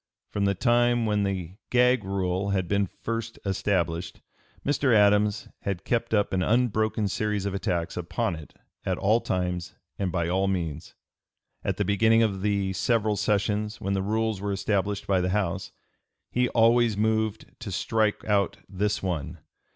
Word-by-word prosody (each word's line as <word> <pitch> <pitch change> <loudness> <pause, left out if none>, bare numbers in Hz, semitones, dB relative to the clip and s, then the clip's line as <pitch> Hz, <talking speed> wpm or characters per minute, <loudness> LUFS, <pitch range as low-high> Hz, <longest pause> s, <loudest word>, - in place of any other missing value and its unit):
From 100 -1 0
the 100 0 +2
time 120 0 +3
when 105 -1 +1
the 95 -2 -3
"gag" 125 -1 +4
rule 95 0 -1
had 95 -3 0
been 100 +1 +1
first 115 +3 -5
established, 85 -4 -1 0.5
Mr. 140 -4 +2
Adams 105 0 +3
had 95 -3 -4
kept 120 -1 0
up 105 -3 +1
an 95 - +1
unbroken 110 -1 +1
series 105 0 -1
of 100 - -2
attacks 85 -3 -2
upon - - -2
it 80 -2 -12 0.3
at - - -1
all 110 +4 +3
times 90 -1 -2 0.2
and 95 -2 0
by 85 -2 0
all 95 +3 +1
means. 85 -5 -3 0.7
At - - -1
the 105 - 0
beginning 110 +3 +4
of 100 -4 -1
the 100 -1 0
several 110 +2 +1
sessions, 105 +1 0
when 100 +1 -2
the 95 - 0
rules 110 0 -1
were 100 0 -2
established 100 0 -1
by 95 -2 +2
the 90 - 0
House, 95 -1 -1 0.6
he 125 0 +1
always 115 -1 +4
moved 110 0 0
to 110 -4 -6
strike 110 +3 0
out 100 -3 +1
this 105 +1 -1
one. 85 -7 -3
100 Hz, 160 wpm, -26 LUFS, 95-110 Hz, 0.7 s, gag